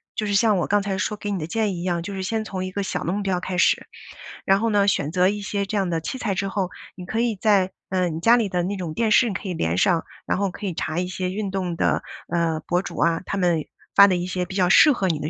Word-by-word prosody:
就 215 - -2
是 205 - -1
像 210 0 +4
我 175 - 0
刚 205 0 +2
才 195 -1 -2
说 210 - -1
给 205 0 -6
你 200 - -1
的 155 - -3
建 210 +2 -1
议 170 - -5
一 - - -5
样， 175 -2 -1
就 200 +4 -6
是 190 - -4
先 220 +3 -1
从 190 -3 -4
一 185 - -5
个 200 - -3
小 195 - -3
的 170 - -1
目 205 - -2
标 190 -2 0
开 185 0 -4
始。 180 - +3 0.6
然 195 +1 +3
后 230 - +1
呢， 205 -2 +3
选 150 -7 +1
择 180 +2 +3
一 205 +1 -3
些 200 0 -2
这 210 +2 -3
样 195 -3 0
的 165 -1 -1
器 210 - -4
材 210 -6 -2
之 195 +1 -1
后， 190 -2 -2 0.3
你 180 - -9
可 225 +5 -1
以 230 -4 0
在 195 -3 +3 0.2
呃， 185 -2 +1
你 160 - -4
家 230 +7 +5
里 220 -5 +1
的 180 -1 0
那 195 +3 -2
种 175 -5 -5
电 225 +5 0
视 240 +2 +5
你 200 - -3
可 190 - -5
以 180 - -2
连 85 - -1
上， 165 - +2 0.2
然 - - 0
后 200 -1 0
可 205 - -8
以 185 - -2
查 155 +2 -3
一 180 - -1
些 185 0 -3
运 200 0 -3
动 180 -3 -3
的， - - +1 0.2
呃， 165 -2 0
博 175 +1 +1
主 - - -8
啊， 165 +1 +2
他 - - -3
们 175 -4 +1 0.3
发 200 - +9
的 185 -2 +1
一 175 +1 -3
些 185 0 -2
比 180 - -7
较 185 -2 +3
适 295 +11 +7
合 200 -8 0
你 160 -4 0
的 150 - -3
190 Hz, 330 characters per minute, -23 LUFS, 175-205 Hz, 0.6 s, 发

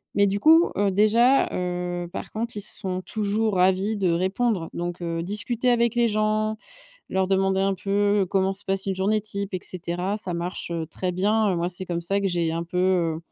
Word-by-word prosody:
Mais 200 - +4
du 200 +1 0
coup 325 +8 +5
heu, 200 -1 +2
déjà, 230 +7 +4
heu, 180 -1 -3
par - - -6
contre 230 +1 -4
ils 205 - -4
sont 185 -2 -3
toujours 215 +1 -1
ravis 190 +4 +2
de 190 -3 +1
répondre 190 +1 0
donc, 175 0 -4
heu, 165 -1 -2
discuter 220 +6 +1
avec 235 -1 +2
les 240 -1 +3
gens, 215 0 0 0.5
leur 190 0 0
demander 190 0 +1
un 195 0 +2
peu 200 +1 +1
comment 190 0 +1
se 195 - -6
passe 195 0 -2
une 195 -1 -1
journée 200 +3 +1
type 200 -1 -5
et 185 - -1
cetera, 180 +2 -3
ça 190 -4 -3
marche, 175 +1 -4
heu, 165 -1 -2
très 180 +2 -3
bien 205 +2 +1
moi 170 +1 0
c'est 180 +1 -5
comme 170 -1 -2
ça 195 +4 -1
que 200 - +1
j'ai 170 -2 0
un 165 +1 -2
peu, 175 +1 -6
heu, 180 -3 +1
195 Hz, 205 wpm, -24 LUFS, 180-210 Hz, 0.5 s, coup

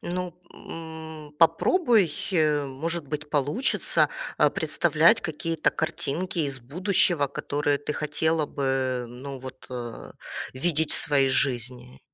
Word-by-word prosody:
Ну, 180 -1 -4 0.2
м, 160 -2 -9
попробуй, 195 - +3 0.5
может 145 +4 -4
быть, 150 +1 -5
получится, 150 - +2 0.3
а, - - +5
представлять 225 +1 +3
какие-то 165 0 -1
картинки 175 +4 -2
из 140 -3 -1
будущего, 175 - +1
которые 145 +1 -1
ты 145 - -3
хотела 155 +1 0
бы, 130 -3 -1
ну, 130 +3 -8
вот, 130 0 -10
э, 120 -2 -7 0.4
видеть 160 +3 +1
в - - +7
своей 140 -2 +4
жизни. 125 - -1
150 Hz, 115 wpm, -26 LUFS, 135-165 Hz, 0.5 s, в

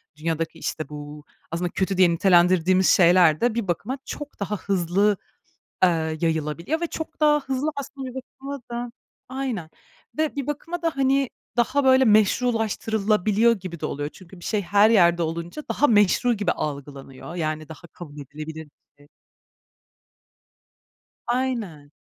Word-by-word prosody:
dünyadaki, 165 +1 -3
işte, 155 -2 -4
bu 150 0 -9 0.3
aslında 175 +2 -2
kötü 190 +1 -1
diye 185 -2 +6
nitelendirdiğimiz 180 +1 +4
şeyler 175 -3 +5
de 240 -1 +2
bir 230 -4 -2
bakıma 245 - -2
çok 295 0 -8
daha 210 +1 -2
hızlı, 195 +2 +1 0.7
eee, 160 -3 +2
yayılabiliyor 165 - -1
ve 340 - 0
çok 320 0 -7
daha 300 -1 +4
hızlı 270 +1 -2
aslında 275 -1 -6
bir 250 - -12
bakıma 270 +1 -8
da 240 0 -4 0.4
Aynen 255 -11 -4 0.5
ve 310 -1 0
bir 280 -1 -3
bakıma 330 +4 -4
da, 330 -1 +1
hani, 270 -1 +2 0.3
daha 255 +4 +2
böyle 260 0 +6
meşrulaştırılabiliyor 215 -1 +2
gibi 175 -3 -7
de - - -3
oluyor. 145 +1 -3
Çünkü 185 0 -14
bir - - -11
şey 210 -2 0
her 205 +3 +4
yerde 175 -6 +4
olunca 170 - -5
daha 290 - +2
meşru 210 +3 +3
gibi 205 -5 0
algılanıyor, 140 +1 -6
yani 155 -2 -3
daha 160 +2 -11
kabul 150 -4 -12
edilebilir 155 +3 -8
bir - - -23 0.3
şey. 145 - -21 2.2
Aynen. 230 - -2
195 Hz, 145 wpm, -24 LUFS, 165-250 Hz, 2.2 s, diye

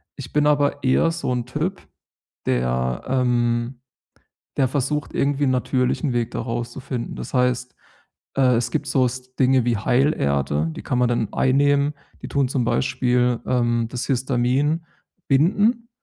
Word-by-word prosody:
Ich 135 - -9
bin 150 0 +2
aber 145 -1 +2
eher 130 +5 +3
so 165 -6 -3
'n 125 -1 -2
Typ, 155 +9 -3 0.6
der, 60 0 0
ähm 120 -1 0 0.8
der 135 - +3
versucht, 145 +2 -2
irgendwie 145 +1 +1
'n 135 - +2
natürlichen 130 +2 0
Weg 120 -2 -1
da - - -3
rauszufinden. 120 +1 -4
Das - - -7
heißt, 125 0 +1 0.6
äh, 130 -3 +4
es 115 0 -1
gibt 145 - -2
so 130 0 +2
s 130 +1 -6
Dinge 130 -2 +3
wie 120 -1 +1
Heilerde, 75 - +1
die - - -8
kann 125 - -1
man 125 - +3
dann 120 -3 -1
einnehmen. 140 +2 +2 0.3
Die - - -6
tun 140 -3 +1
zum 130 -2 0
Beispiel, 125 -1 +1
ähm, 120 -2 +1
das 125 -1 -4
Histamin 135 +4 0 0.4
binden, 205 - +2
125 Hz, 150 wpm, -22 LUFS, 120-140 Hz, 0.8 s, äh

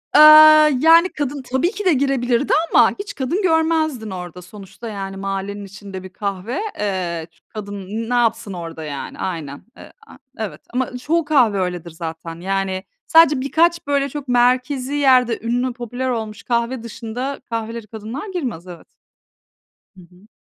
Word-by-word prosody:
Eee, - - +9 0.6
yani, 330 +4 +6
kadın 285 -3 -4
tabii 265 +7 0
ki 415 -2 -6
de 360 - +5
girebilirdi 265 -2 +1 0.2
ama, - - +6
hiç 400 - -6
kadın 280 +9 -1
görmezdin 320 - +1
orada. 180 -1 -7
Sonuçta, 200 +4 -10
yani, 195 -2 -6
mahallenin 195 +1 -4
içinde 195 -1 -9
bir 190 - -9
kahve, 200 - -4 0.2
eee, 180 -5 -2 0.2
kadın 205 -2 -7
n 225 +3 -4
ne - - -1
yapsın 230 -4 +1
orada, 165 -2 -7
yani, 145 -2 -7
aynen, 155 -6 -5
eee, - - -13 0.2
a - - -15 0.2
evet. 220 -3 -5
Ama 250 0 -2
çoğu 320 +6 0
kahve 245 -10 +3
öyledir 180 -2 -3
zaten. 165 0 -7
Yani, 190 0 -2 0.2
sadece 300 -4 +5
birkaç, 335 +3 +1
böyle, 280 -1 +1
çok 285 0 -7
merkezi 250 +2 +1
yerde, 255 -5 +3
ünlü, 245 +2 -1
popüler 245 +2 -4
olmuş 220 -3 -4
kahve 235 0 -1
dışında 235 +4 -5
kahvelere 230 0 -4
kadınlar 225 - -7
girmez, 240 - -4
evet. 175 -2 -11 1.1
Hı - - -13
hı. 180 +4 -21
230 Hz, 155 wpm, -20 LUFS, 195-270 Hz, 1.1 s, Eee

